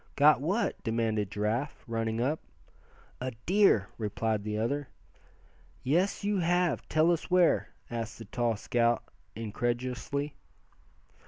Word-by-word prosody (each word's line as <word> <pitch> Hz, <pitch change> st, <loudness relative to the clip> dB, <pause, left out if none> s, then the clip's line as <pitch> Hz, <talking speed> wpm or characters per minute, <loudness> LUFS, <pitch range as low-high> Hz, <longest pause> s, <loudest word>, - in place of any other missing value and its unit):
"Got 145 Hz, -2 st, +6 dB
what?" 195 Hz, +10 st, 0 dB
demanded 110 Hz, -3 st, 0 dB
Giraffe, 110 Hz, +8 st, -2 dB
running 115 Hz, -1 st, -1 dB
up. 140 Hz, +6 st, +1 dB, 0.8 s
"A 130 Hz, 0 st, -3 dB
deer!" 185 Hz, -, +4 dB
replied 110 Hz, 0 st, -1 dB
the 105 Hz, 0 st, -2 dB
other. 140 Hz, +6 st, -1 dB, 1.0 s
"Yes, 175 Hz, +11 st, +1 dB
you 205 Hz, -1 st, +1 dB
have. 175 Hz, -4 st, +1 dB
Tell 155 Hz, +2 st, +4 dB
us 170 Hz, -, -1 dB
where?" 180 Hz, -2 st, +4 dB, 0.2 s
asked 115 Hz, -2 st, -4 dB
the 115 Hz, -, -9 dB
tall 115 Hz, +2 st, 0 dB
scout, 120 Hz, +2 st, +1 dB, 0.3 s
incredulously. 120 Hz, +6 st, -2 dB
120 Hz, 115 wpm, -30 LUFS, 115-155 Hz, 1.0 s, Got